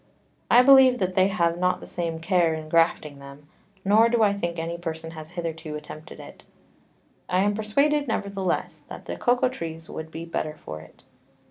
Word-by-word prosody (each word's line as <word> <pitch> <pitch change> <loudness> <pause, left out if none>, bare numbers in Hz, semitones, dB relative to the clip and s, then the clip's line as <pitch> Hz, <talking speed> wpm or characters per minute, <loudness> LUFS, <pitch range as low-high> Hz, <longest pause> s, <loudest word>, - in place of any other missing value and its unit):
I 245 +1 +7
believe 265 -1 +7
they 185 -1 +2
have 170 -3 0
not 180 0 +1
the - - -10
same 170 -2 -3
care 170 -1 +2
in 155 -1 -8
grafting 155 -3 +1
them, 140 +1 -13 0.4
nor 220 +4 +5
do 235 -1 +2
I 205 -1 +3
think 170 -4 -3
any 165 +1 -3
Person 165 -1 -6
has 155 -1 -9
hitherto 165 -3 -5
attempted 155 +1 -10
to - - -10
do - - -11
it: - - -16 0.9
I 180 +1 +2
am 205 +1 +2
persuaded 280 +8 +1
nevertheless, 200 -5 -2
that - - -9
the - - -5
Cocao 250 +1 +2
Trees 165 -9 -7
would 160 0 -7
be 165 +1 -7
better 155 -2 -4
for 75 0 -8
it. 80 - -18
170 Hz, 190 wpm, -25 LUFS, 160-205 Hz, 0.9 s, I